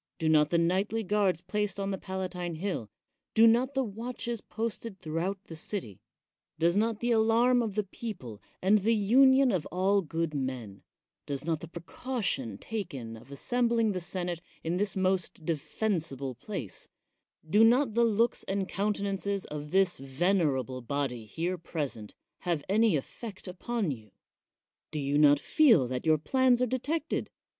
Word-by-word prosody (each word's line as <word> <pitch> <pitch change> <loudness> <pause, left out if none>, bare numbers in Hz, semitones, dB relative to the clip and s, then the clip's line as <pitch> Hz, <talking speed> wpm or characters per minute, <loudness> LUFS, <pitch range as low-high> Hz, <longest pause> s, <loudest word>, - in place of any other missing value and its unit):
Do 160 - -1
not 150 -1 +5
the 170 - +2
nightly 190 +6 +1
guards 195 -3 +1
placed 210 0 -1
on 195 0 -1
the 195 - -2
Palatine 185 -2 -4
Hill 165 - -3 0.2
— - - -56
do 225 - +7
not 245 +4 +4
the 265 - +2
watches 235 +1 -4
posted 225 -2 -4
throughout 180 +4 -3
the 165 - -9
city 155 - -3 0.3
— - - -63
does 170 +2 +2
not 220 +1 +1
the 240 0 +1
alarm 230 +2 +4
of 215 -4 -3
the 210 - +1
people, 180 - -7 0.2
and 205 +3 +5
the 225 +4 +2
union 260 +5 +5
of 180 -6 -1
all 195 +3 +2
good 165 -1 -2
men 130 -8 -4 0.2
— - - -62
does 140 0 -3
not 165 -2 0
the 170 - -8
precaution 170 - -3
taken 150 - -5
of 115 +4 -14
assem 240 - 0
bling 230 -2 +2
the 185 -2 -3
senate 175 -1 -2 0.2
in 165 +2 -1
this 200 -1 0
most 185 -4 0
defensible 155 - -1
place 125 - -5 0.3
— - - -35
do 210 +7 +5
not 240 +1 +4
the 235 +2 +3
looks 230 +1 +2
and 195 -1 -1
countenances 200 -1 -1
of 150 0 -6
this 190 +1 +3
venerable 135 - 0
body 125 -3 -3
here 170 - -3
present, 145 -11 -4 0.2
have 170 -5 -1
any 215 -1 +3
effect 195 - -6
upon 195 +1 -2
you? 110 -5 -8 0.8
Do 155 - -5
you 145 0 +1
not 145 -1 +6
feel 230 - +4
that 130 +4 -3
your 155 -1 +5
plans 255 - +3
are 250 - +3
detected? 285 +6 -2
185 Hz, 165 wpm, -29 LUFS, 155-220 Hz, 0.8 s, do